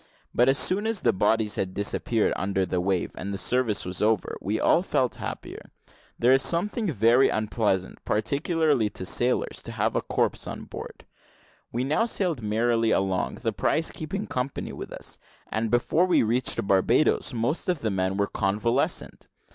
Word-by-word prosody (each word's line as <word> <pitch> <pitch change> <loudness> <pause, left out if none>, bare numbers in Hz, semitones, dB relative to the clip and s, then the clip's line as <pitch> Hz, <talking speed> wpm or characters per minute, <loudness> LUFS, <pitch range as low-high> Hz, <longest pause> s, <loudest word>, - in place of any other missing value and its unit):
But 125 +2 +4
as 135 - +4
soon 200 +7 +3
as 225 -3 0
the 115 - +3
bodies 105 +2 +1
had 95 -1 -2
disappeared 105 +2 0
under 95 -1 -1
the 90 0 -1
wave, 95 -1 -1
and 100 - -5
the 100 - -3
service 115 -3 +1
was 90 -1 -3
over, 110 -1 +1
we - - -1
all - - +4
felt - - 0
happier. - - -6 0.6
There 120 +2 +3
is 135 - +4
something 205 - +1
very 120 +2 +4
unpleasant, 105 -3 -1
particularly 140 +2 +1
to 95 - -6
sailors, 120 +6 +1
in - - -7
having - - 0
a - - -5
corpse - - -1
on - - -6
board. - - -9 0.7
We 120 +2 -1
now 155 - +1
sailed 180 - -1
merrily 115 +2 +1
along, 95 -3 0
the - - 0
prize 160 +1 +1
keeping 190 +7 -5
company 130 -3 -4
with - - -8
us; - - -6 0.3
and, 110 +1 -1
before 150 +10 +2
we 180 - +3
reached 115 -1 +1
Barbadoes, 100 +12 +2
most 120 - -1
of 175 -5 0
the 110 - -1
men 95 0 -1
were 100 - +2
convalescent. 105 +7 -1
115 Hz, 170 wpm, -26 LUFS, 100-140 Hz, 0.7 s, But